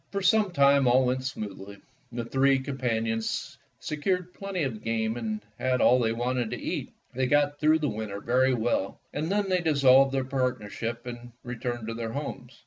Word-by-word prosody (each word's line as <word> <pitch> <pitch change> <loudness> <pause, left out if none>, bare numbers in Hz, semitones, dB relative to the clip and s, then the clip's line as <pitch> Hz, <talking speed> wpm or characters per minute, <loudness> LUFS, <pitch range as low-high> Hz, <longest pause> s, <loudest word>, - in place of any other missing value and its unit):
For 200 -1 -3
some 210 +1 +4
time 140 -4 +4
all 130 +2 +5
went 130 +1 0
smoothly, 100 -6 -6 0.3
the 120 -1 -4
three 135 +2 +3
companions 115 -5 -2 0.2
secured 180 +4 -2
plenty 195 -4 -3
of 115 -6 -3
game 110 0 -1
and 110 -3 -3 0.2
had 130 0 +1
all 125 +1 +5
they 115 -2 +1
wanted 120 0 -1
to - - -4
eat. - - -4 0.2
They 130 +1 0
got 145 +1 +2
through 155 +1 +4
the 155 -2 -1
winter 105 -3 -4
very 130 +4 +2
well, 110 -4 -1
and 155 +4 -2
then 205 0 +1
they 185 -1 +1
dissolved 135 -4 +5
their 135 -1 0
partnership 120 -3 -3
and 120 -1 -8
returned 120 -1 -4
to 115 - -3
their 115 -1 -4
homes. 140 -3 -6
125 Hz, 180 wpm, -27 LUFS, 115-140 Hz, 0.3 s, all